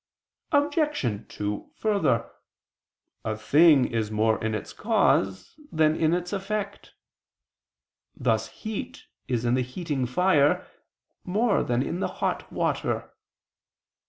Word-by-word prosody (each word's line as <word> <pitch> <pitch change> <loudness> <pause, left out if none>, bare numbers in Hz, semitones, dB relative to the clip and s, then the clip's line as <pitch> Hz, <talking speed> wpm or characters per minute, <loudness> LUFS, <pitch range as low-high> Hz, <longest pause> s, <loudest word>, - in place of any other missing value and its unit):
Obj. 290 - +1
2: 105 0 -4
Further, 200 - +1 0.9
a 110 -1 -2
thing 145 +4 +5
is 110 -2 -2
more 110 +1 +1
in 110 0 0
its 105 - -6
cause 95 -1 +1 0.2
than 155 -1 +3
in 160 +1 +2
its 180 +2 -4
effect: 200 +1 -4 1.2
thus - - 0
heat 220 -2 -7 0.2
is 120 -2 -1
in 120 - +2
the 130 - +2
heating 135 0 -3
fire 150 +1 +3 0.6
more 210 +4 +1
than 120 +1 0
in 175 - -3
the - - 0 0.2
hot - - -1
water. - - -1
150 Hz, 115 wpm, -26 LUFS, 115-195 Hz, 1.2 s, thing